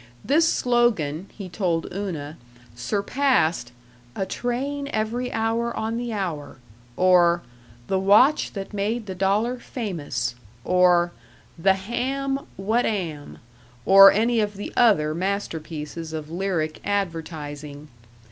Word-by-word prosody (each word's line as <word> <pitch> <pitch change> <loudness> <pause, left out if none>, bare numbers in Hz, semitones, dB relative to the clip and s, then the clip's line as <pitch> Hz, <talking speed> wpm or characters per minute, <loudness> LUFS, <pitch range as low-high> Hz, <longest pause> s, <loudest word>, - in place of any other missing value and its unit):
This 320 +4 +3
slogan, 205 -10 +1
he 200 -3 -8
told 175 -3 -1
Una, 165 -7 -5 0.4
surpassed 175 - 0 0.4
"A 195 - -1
train 275 +6 -3
every 230 +3 -2
hour 225 +1 -1
on 225 +1 -2
the 240 0 -3
hour," 175 -11 -4 0.4
or 175 -2 +4 0.4
"The 190 +6 0
watch 210 +10 +4
that 195 0 -6
made 210 +3 -2
the 190 - -5
dollar 205 +7 0
famous," 155 - -4 0.3
or, 180 -1 +4 0.4
"The 190 +3 +3
ham 270 +7 -3
what 220 +6 +1
am," 165 -9 -4 0.5
or 195 0 +9
any 230 +3 +2
of 205 -2 -1
the 205 - -6
other 175 -11 +4
masterpieces 165 -4 -4
of 155 -1 -6
lyric 170 -4 -2
advertising. 155 -6 -4
195 Hz, 115 wpm, -24 LUFS, 165-230 Hz, 0.5 s, or